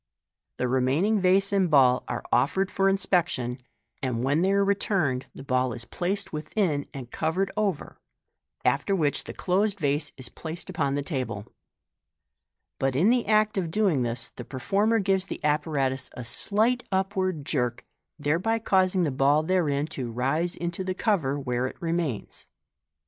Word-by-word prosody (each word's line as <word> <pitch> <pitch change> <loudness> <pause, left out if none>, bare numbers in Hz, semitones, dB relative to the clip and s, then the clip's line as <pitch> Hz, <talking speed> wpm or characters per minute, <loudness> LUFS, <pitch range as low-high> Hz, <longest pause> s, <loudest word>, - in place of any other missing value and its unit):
The 125 - 0
remaining 135 - +2
vase 195 +2 +3
and 190 -3 +3
ball 130 -4 +5
are - - -3
offered 190 +7 +2
for 195 0 +2
inspection, 175 -10 0 0.4
and 125 -3 -1
when 145 +5 +2
they 190 +2 +2
are 200 0 +3
returned, 190 -10 0
tha - - -9
ball 130 -2 0
is 120 +1 -7
placed 185 +8 -2
within 155 -1 -1
and 130 -3 -8
covered 185 +5 -1
over, 205 -7 -2 0.7
after 200 - +2
which 150 -6 0
the - - -7
closed 200 +2 0
vase 145 -1 0
is 130 -2 -7
placed 165 +7 -6
upon 140 -6 0
the 145 - -1
table 130 - -3
j - - -24 1.3
but 135 -1 0
in 185 - +4
the 245 -1 +1
act 215 -1 +3
of 170 -3 -2
doing 185 -6 +2
this 120 0 -2
the - - -9
performer 200 - +1
gives 195 -2 +1
the - - -5
apparatus 145 -3 0
a 125 - -7
slight 215 - +3
up 190 +1 0
ward 185 -6 -1
jerk, 125 -5 -1 0.3
thereby 165 +10 +1
causing 190 -4 +2
the 150 - 0
ball 140 +3 +3
therein 155 -5 +1
to 130 -6 -5
rise 140 +9 0
into 175 +2 -3
the 185 0 -3
cover, 165 - 0
where 125 -1 -1
it - - -10
remains. 165 - -3
160 Hz, 165 wpm, -26 LUFS, 135-195 Hz, 1.3 s, ball